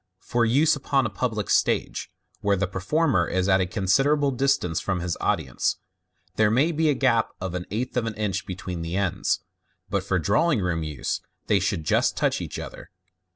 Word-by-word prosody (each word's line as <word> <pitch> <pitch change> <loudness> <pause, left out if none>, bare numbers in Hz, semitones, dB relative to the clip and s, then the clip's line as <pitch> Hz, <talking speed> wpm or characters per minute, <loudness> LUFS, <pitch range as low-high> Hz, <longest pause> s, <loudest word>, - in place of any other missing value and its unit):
For 120 +3 0
use 140 +8 +4
upon 135 -1 +1
a 110 - -2
public 110 0 -2
stage, - - +1 0.3
where 100 -1 +1
the 100 - +1
performer 100 - +1
is 95 +1 0
at 95 -1 +4
a 90 - 0
considerable 135 +10 +2
distance 125 -10 +1
from 95 -2 -2
his 85 -1 -2
audience, 60 -3 0 0.6
there 110 -1 +4
may 140 +10 +2
oe 160 0 +2
a 145 - +2
gap 115 -3 +2
of 95 -1 -4
an 90 -1 -4
eighth 120 +5 -3
of 120 -2 0
an 110 - -4
inch 105 -3 -2
between 90 -2 -5
the 85 +1 -4
ends, 95 -3 0 0.5
but - - 0
for - - 0
drawing 165 -5 +2
room 90 -3 -1
use, 75 -4 -3 0.2
they 105 - +3
should 95 -3 -1
just 75 - +2
touch - - +1
each - - -5
other. - - -8
100 Hz, 190 wpm, -25 LUFS, 90-130 Hz, 0.6 s, use